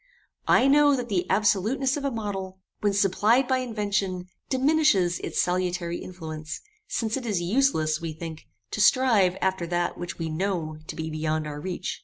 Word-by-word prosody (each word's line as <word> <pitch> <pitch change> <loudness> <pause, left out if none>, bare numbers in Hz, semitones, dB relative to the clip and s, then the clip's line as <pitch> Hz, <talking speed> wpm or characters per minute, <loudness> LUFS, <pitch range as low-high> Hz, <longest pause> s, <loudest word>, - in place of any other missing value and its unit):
I 250 - +5
know 290 0 +5
that 245 -2 -4
the 185 -4 -1
absoluteness 215 +7 +2
of 290 - -4
a 280 - +1
model, 200 -5 -4 0.2
when 205 -1 +1
supplied 205 +6 +3
by 260 -1 +2
invention, 200 -6 -2 0.2
diminishes 260 - +3
its - - -3
salutary 180 -1 0
influence, 155 -4 -7 0.3
since 225 +1 -1
it 260 - -6
is 205 -5 0
useless, 175 - +1
we 165 -1 -3
think, 160 0 -8 0.2
to 215 - -1
strive 210 -7 +4
after 190 -2 0
that 175 0 -1
which 175 +1 -5
we 165 - -3
know 160 -2 -2
to - - -6
be 160 -1 -4
beyond 155 0 -1
our 150 -1 -5
reach. 180 +1 -4
190 Hz, 170 wpm, -26 LUFS, 170-235 Hz, 0.3 s, I